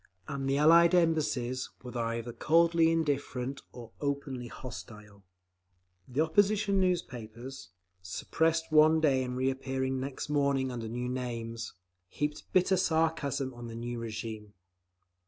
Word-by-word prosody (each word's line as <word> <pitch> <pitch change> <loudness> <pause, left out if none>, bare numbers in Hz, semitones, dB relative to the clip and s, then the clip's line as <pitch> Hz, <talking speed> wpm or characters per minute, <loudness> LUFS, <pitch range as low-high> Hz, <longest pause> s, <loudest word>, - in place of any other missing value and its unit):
And 135 -1 -3
the 135 - +2
Allied 170 +4 +6
Embassies 145 -7 +1
were 125 0 -8
either 115 0 -2
coldly 165 +2 +4
indifferent, 140 -4 -1
or 120 -2 -10
openly 140 -3 -3
hostile…. 105 -3 -10 0.8
The 130 +4 0
opposition 200 +4 +3
newspapers, 125 - -3 0.3
suppressed 160 - 0
one 155 +1 +6
day 135 -4 +3
and 125 0 -4
reappearing 130 0 -1
next 135 +1 -4
morning 140 -3 +1
under 115 -2 -5
new 125 +2 -3
names, 115 -2 -4 0.3
heaped 150 +8 -4
bitter 185 0 +3
sarcasm 160 -6 0
on 120 -1 -8
the 115 - -7
new 120 +1 -4
regime. 110 -2 -6
130 Hz, 120 wpm, -30 LUFS, 120-160 Hz, 0.8 s, Allied